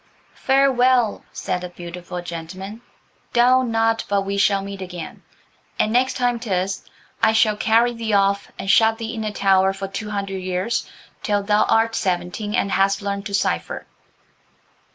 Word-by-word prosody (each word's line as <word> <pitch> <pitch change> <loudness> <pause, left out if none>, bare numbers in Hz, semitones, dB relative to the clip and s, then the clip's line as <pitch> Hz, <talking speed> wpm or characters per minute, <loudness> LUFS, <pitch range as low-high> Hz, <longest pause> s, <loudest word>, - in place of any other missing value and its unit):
"Farewell," 255 -4 +2
said 180 - -3
the 180 - -6
beautiful 175 0 -7
gentleman, 185 +6 -7 0.5
"doubt 250 +1 +4
not 225 0 +1
but 200 -1 +1
we 200 +1 -3
shall 200 0 +2
meet 200 0 -7
again. 180 -3 -7 0.6
And 215 - +1
next 255 +2 +2
time 245 -2 +1
'tis 195 -4 -2 0.4
I 220 - +4
shall 220 -1 +3
carry 230 +3 +3
thee 225 -2 -3
off 200 0 +2
and - - -6
shut 220 +3 +4
thee 225 0 -5
in 220 -2 -4
a 215 - -2
tower 195 -1 +3
for 195 0 -5
two 210 +2 -5
hundred 200 -2 -3
years 185 +4 -2 0.3
till 205 -1 0
thou 210 +1 +3
art 225 0 +2
seventeen 185 +2 -2
and 200 - 0
hast 195 +1 +2
learned 200 0 -3
to 200 - -2
cipher." - - -1
200 Hz, 160 wpm, -21 LUFS, 195-225 Hz, 0.6 s, doubt